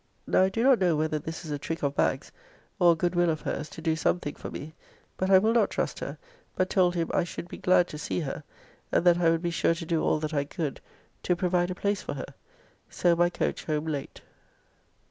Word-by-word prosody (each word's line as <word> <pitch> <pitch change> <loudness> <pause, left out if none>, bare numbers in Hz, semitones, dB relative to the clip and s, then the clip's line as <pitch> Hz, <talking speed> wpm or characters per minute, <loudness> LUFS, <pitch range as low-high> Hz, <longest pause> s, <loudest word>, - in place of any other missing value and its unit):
Now - - +3
I 190 - +4
do 225 +4 -1
not 265 -2 +5
know 180 -4 +3
whether 155 0 0
this 160 +2 -7
is 155 - -6
a 145 - -2
trick 165 +1 -5
of 140 -1 +1
Bagge's, - - 0 0.5
or 175 -2 +6
a - - -3
good 175 +2 0
will 175 -1 +3
of 155 -2 -1
hers 150 - -4
to 165 - -10
do 160 -1 +1
something 160 -1 0
for - - -8
me; 155 +2 -8 0.4
but 185 - -1
I 190 - +8
will 220 +4 +3
not 230 -4 +3
trust - - -2
her, - - -5 0.4
but 185 0 0
told 180 -2 +3
him 165 -1 -1
I - - +3
should 175 0 -7
be - - -9
glad 180 -1 +4
to 150 - -7
see 175 - -2
her, 150 +1 -5 0.5
and - - +2
that 175 -1 +5
I 170 -2 +4
would 165 +1 +1
be 170 - 0
sure 165 0 +2
to 165 0 -6
do 160 -1 0
all - - +2
that 155 +1 -4
I 145 -1 +1
could 150 0 -4 0.4
to 180 - +1
provide 180 0 +1
a 185 - -3
place 200 0 -1
for - - -5
her. 135 - -7 0.6
So 175 -1 +2
by 175 +1 +3
coach - - -2
home 155 -1 -1
late. 145 -4 -5
170 Hz, 245 wpm, -27 LUFS, 155-180 Hz, 0.6 s, I